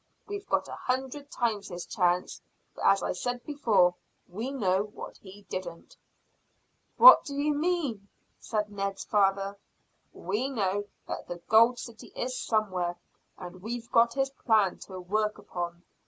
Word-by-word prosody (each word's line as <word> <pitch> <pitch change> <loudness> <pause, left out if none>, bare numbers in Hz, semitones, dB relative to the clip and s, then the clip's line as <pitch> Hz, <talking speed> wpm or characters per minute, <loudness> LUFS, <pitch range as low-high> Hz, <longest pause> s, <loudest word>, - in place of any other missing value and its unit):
We've 405 -1 -6
got - - +1
a - - -8
hundred 265 +3 -3
times 225 -7 -1
his 175 -1 -6
chance, 180 -1 0 0.3
for, - - -8
as - - +4
I - - 0
said 245 0 -3
before, 215 -12 +3 0.3
we 220 +8 -4
know 195 -9 +1
what 210 0 -8
he 200 +1 -14
didn't." 170 -3 -7 1.0
"What - - +10
do 280 - -6
you 295 +1 +1
mean?" 290 - -1 0.3
said 210 -2 -2
Ned's 195 -1 -3
father. 195 -1 +1 0.5
"We 210 +9 -2
know 205 -5 -1 0.2
that - - -5
the 175 - -5
gold 230 +3 +6
city 235 -2 -9
is 255 +1 -3
somewhere, 185 -7 -1 0.4
and 180 0 -9
we've 230 +3 -6
got 235 +1 +4
his 270 0 0
plan 220 -7 +2
to 185 -1 -8
work 210 +4 -1
upon. 175 -4 -6
210 Hz, 150 wpm, -28 LUFS, 190-250 Hz, 1.0 s, What